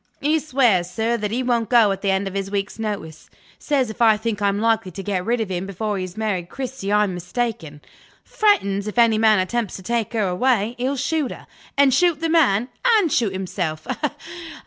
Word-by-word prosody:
He 305 +3 +2
swears, 245 - +2
sir, 225 +5 -1
that 210 -2 -3
he 245 +4 -1
won't 235 -3 0
go 230 -5 +5
at 195 - -4
the 200 - 0
end 190 +1 +1
of 195 - -6
his 195 0 -3
week's 200 +2 -3
notice. 205 -8 -5 0.3
Says, 270 -6 0
if 230 - -10
I 220 -2 +5
think 220 -1 -3
I'm 200 0 +1
likely 225 -2 +1
to 195 +2 -8
get 190 -2 -2
rid 235 +4 0
of 220 -3 -2
him 185 +1 -3
before 205 +2 -3
he - - -2
has 185 +2 -8
married 195 -6 -2
Cristy, 255 -6 -5
I'm 210 -2 +2
mistaken. 175 - -4 0.4
Threatens, 210 - +1
if 210 - -6
any 230 -2 +4
man 220 -1 +5
attempts 210 +3 -1
to 190 - -9
take 235 +1 -2
her 215 -4 +1
away, 220 +3 +1
he'll 265 +3 -1
shoot 290 +1 -1
her, - - -10 0.3
and 280 -2 +5
shoot 345 -1 +3
the 330 0 -1
man, 255 -8 +3 0.3
and 355 -8 +1
shoot 230 -6 +1
himself. 180 -4 -4
215 Hz, 210 wpm, -22 LUFS, 195-245 Hz, 0.4 s, go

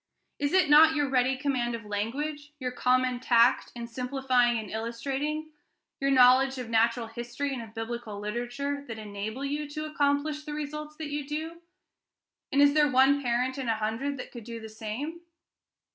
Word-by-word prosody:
Is 285 0 0
it 375 -3 +5
not 310 +2 +7
your 290 -2 +1
ready 260 0 +2
command 255 -4 -1
of 230 -2 -8
language, 290 +9 -3
your 250 -2 -2
uncommon 255 0 +1
tact 240 0 +3
in 235 -1 -5
simplifying 250 0 +1
and 220 -1 -5
illustrating, 270 +8 -3 0.5
your 275 - +1
knowledge 260 0 +5
of 245 -3 -6
natural 230 +1 +2
history 240 +5 -4
and 250 - -4
of 225 0 -11
Biblical 225 -2 -5
literature, 245 +7 -3
that 225 - -6
enable 215 +5 -5
you 290 +1 -3
to 305 +1 -4
accomplish 295 0 0
the 300 -1 -6
results 300 0 -5
that 305 -2 -6
you 290 -1 -3
do? 320 +3 -5 0.9
And 280 +1 +5
is 285 0 +5
there 300 -1 +4
one 270 +2 +4
parent 250 +2 0
in 255 -3 -2
a 225 - +2
hundred 225 +6 -2
that - - -8
could 240 -3 -9
do 230 +1 -7
the 220 0 -9
same? 230 +10 -5
260 Hz, 175 wpm, -28 LUFS, 235-290 Hz, 0.9 s, not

